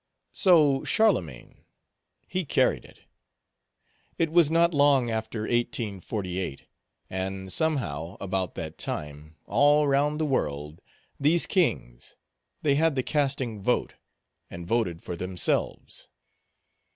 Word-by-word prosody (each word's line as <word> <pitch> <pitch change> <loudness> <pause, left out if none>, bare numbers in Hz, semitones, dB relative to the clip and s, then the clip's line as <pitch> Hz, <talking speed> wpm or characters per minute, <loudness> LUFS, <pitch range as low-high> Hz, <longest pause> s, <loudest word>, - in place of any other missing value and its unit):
So 150 -8 +4
Charlemagne, 90 - 0 0.6
he 185 0 -2
carried 145 - +1
it. - - -18 1.2
It 165 -2 0
was 165 -3 +5
not 170 +1 +3
long 140 -4 +3
after 110 0 -3
1848; 100 - -3 0.4
and, 95 0 -4
somehow, 95 - -1
about 95 -2 -3
that 80 -1 -7
time, 75 +1 -6
all 145 +1 +3
round 145 +2 +1
the 155 - +1
world, 75 - -2 0.4
these 160 +4 +3
kings, - - -1 0.5
they 145 - +3
had 155 +1 +2
the 130 - 0
casting 135 -8 -1
vote, 125 +5 0 0.6
and 85 0 -8
voted 90 -5 -1
for 90 - -5
themselves. 90 +1 -1
120 Hz, 110 wpm, -26 LUFS, 90-150 Hz, 1.2 s, was